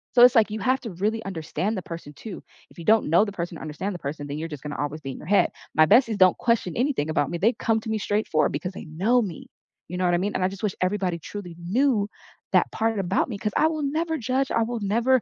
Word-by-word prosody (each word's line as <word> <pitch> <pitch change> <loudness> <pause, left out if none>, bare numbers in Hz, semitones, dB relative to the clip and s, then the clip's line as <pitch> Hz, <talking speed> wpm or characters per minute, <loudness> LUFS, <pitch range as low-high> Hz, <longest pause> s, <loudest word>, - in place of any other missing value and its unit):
So 245 - +8
it's 250 0 +8
like 220 -2 +4
you 215 - -3
have 260 +1 +2
to 225 - -6
really 215 +5 -1
understand 190 +3 -2
the 185 - -2
person 165 -3 -8
too. 205 +6 -9 0.3
If - - -20
you 165 - -8
don't 220 -6 +4
know 175 +6 +5
the 205 - -5
person 175 -3 -4
or - - -11
understand 170 +6 -4
the 175 - -7
person, 145 0 -5
then 145 +1 -4
you're 165 - -3
just 150 -4 -7
gonna 150 -1 -5
always 145 +2 -3
be 135 -2 -5
in - - -8
your - - -11
head. 200 +1 +4 0.2
My 155 0 +7
besties 230 - +5
don't 185 -1 +6
question 230 -7 0
anything 245 - 0
about 145 -3 +1
me. 170 - -2
They 225 +7 +3
come 225 -2 0
to 225 - -7
me 220 - 0
straightforward 205 -8 +1
because 180 +6 -3
they - - -8
know 195 +11 +2
me. 185 -8 -6 0.4
You 180 - -5
know 185 - -1
what 175 - +3
I - - +3
mean? 205 +3 -1
And 185 - 0
I 185 - +2
just 195 +1 -10
wish 205 -3 0
everybody 185 -2 0
truly 180 0 -8
knew 210 +4 +1 0.4
that - - +4
part 225 -2 0
about 190 +6 0
me, 205 - -4
'cause 210 0 -3
I 315 - +5
will 310 -2 -2
never 320 +3 -1
judge, 260 +3 0
I 230 - +2
will 235 0 -3
never 235 +5 +2
200 Hz, 275 wpm, -25 LUFS, 170-230 Hz, 0.4 s, So